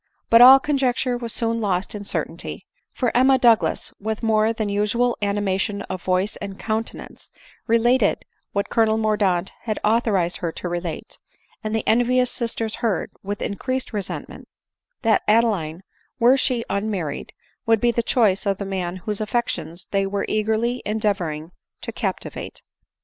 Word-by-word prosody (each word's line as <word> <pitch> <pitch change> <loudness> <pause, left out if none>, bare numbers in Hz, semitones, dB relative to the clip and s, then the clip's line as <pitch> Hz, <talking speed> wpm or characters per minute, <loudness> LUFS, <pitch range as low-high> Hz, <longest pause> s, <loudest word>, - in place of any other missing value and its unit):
But 230 +1 +8
all 260 +2 +10
conjecture 265 -3 0
was 235 -1 -5
soon 230 0 -1
lost 195 -4 -1
in 205 -1 -6
cer - - 0
tainty; - - -8 0.3
for 245 -3 -1
Emma 260 +2 +5
Douglas, 235 -3 +3
with 220 +2 -4
more 220 0 +3
than 220 -2 -2
usual 210 +4 +1
anima 200 -2 0
tion 200 0 -2
of 185 - -6
voice 185 +3 0
and 200 -2 -7
countenance, 220 +1 -5 0.4
related 230 0 +2 0.3
what 200 0 -2
Colonel 220 -1 +3
Mordaunt 205 -4 +1
had 215 -3 -3
authorized 210 -6 +2
her 170 -2 -3
to - - -5
relate;. 175 -2 -5 0.4
and 215 0 -2
the'envious 245 +3 +2
sisters 230 -2 -2
heard, 220 -6 -1
with 205 +1 -4
increased 255 +6 -3
resentment, 205 -3 -5 0.6
that 225 -2 +3
Adeline, 200 -7 +2 0.3
were 245 +3 +5
she 250 -3 0
unmarried, 200 -7 -3 0.4
would 225 -1 +4
be 240 +1 +3
the 235 - 0
choice 210 -5 +2
of 195 -1 +1
the 200 - -4
man 185 -2 -3
whose 210 -1 -1
affections 205 -6 -2
they 195 -1 +1
were 200 0 -2
eagerly 220 +3 0
endeavoring 185 -7 -2 0.3
to - - -5
cap - - -2
tivate. - - -8
215 Hz, 155 wpm, -22 LUFS, 195-235 Hz, 0.6 s, all